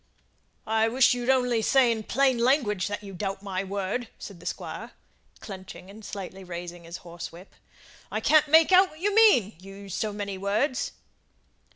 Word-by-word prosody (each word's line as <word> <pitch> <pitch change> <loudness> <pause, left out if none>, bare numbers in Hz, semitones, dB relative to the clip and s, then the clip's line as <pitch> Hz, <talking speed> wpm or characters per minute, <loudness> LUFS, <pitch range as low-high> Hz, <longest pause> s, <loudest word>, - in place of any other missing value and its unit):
"I 220 0 +2
wish 250 +3 +4
you'd 245 0 -3
only 250 -3 +3
say 255 +1 +4
in 225 -1 -2
plain 260 +2 +1
language 235 - +2
that 205 0 -5
you 195 -1 -9
doubt 195 +2 -4
my 190 -1 -3
word," 200 +5 -3
said 195 -4 -10
the - - -9
Squire, - - -6 0.5
clenching 190 -1 -10
and 215 +2 -13
slightly 195 -1 -7
raising 175 -1 -8
his 170 +1 -8
horsewhip. 170 +2 -9 0.6
"I - - -1
can't 310 -1 +4
make 320 +3 +5
out 375 +1 +6
what 310 - -16
you 405 +3 0
mean 400 - +5
you 195 +1 -12
use 200 -2 -9
so 215 - -1
many 200 -2 -5
words." 215 +7 -1
210 Hz, 175 wpm, -26 LUFS, 190-255 Hz, 0.6 s, out